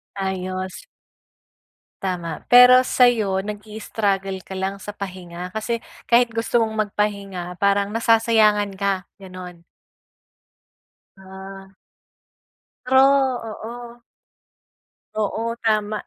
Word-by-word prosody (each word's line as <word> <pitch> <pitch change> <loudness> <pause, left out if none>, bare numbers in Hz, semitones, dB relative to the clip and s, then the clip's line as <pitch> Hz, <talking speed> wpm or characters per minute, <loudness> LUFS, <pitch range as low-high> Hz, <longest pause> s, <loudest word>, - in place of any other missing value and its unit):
Ayos. 185 -1 -4 1.2
Tama. 175 -4 -4
Pero 250 +1 +8
sa 250 -1 +5
iyo, 210 -5 -1
nag-i-struggle 205 -2 -3
ka 190 +1 -10
lang 190 +1 -3
sa 205 +1 -8
pahinga 180 -2 -7
kasi 230 +2 -3 0.2
kahit 240 0 +4
gusto 230 +1 +1
mong 220 -1 -1
magpahinga 195 -4 -3
parang 200 0 +2
nasasayangan 220 -2 +3
ka, 195 -2 0 0.2
ganoon. 180 -2 -10 1.5
Ah. 190 0 -11 1.2
True, 260 +1 +4 0.5
oo. 235 +2 -9 1.2
Oo 225 +2 -2
tama. 215 -1 +1
200 Hz, 90 wpm, -22 LUFS, 190-225 Hz, 1.5 s, Pero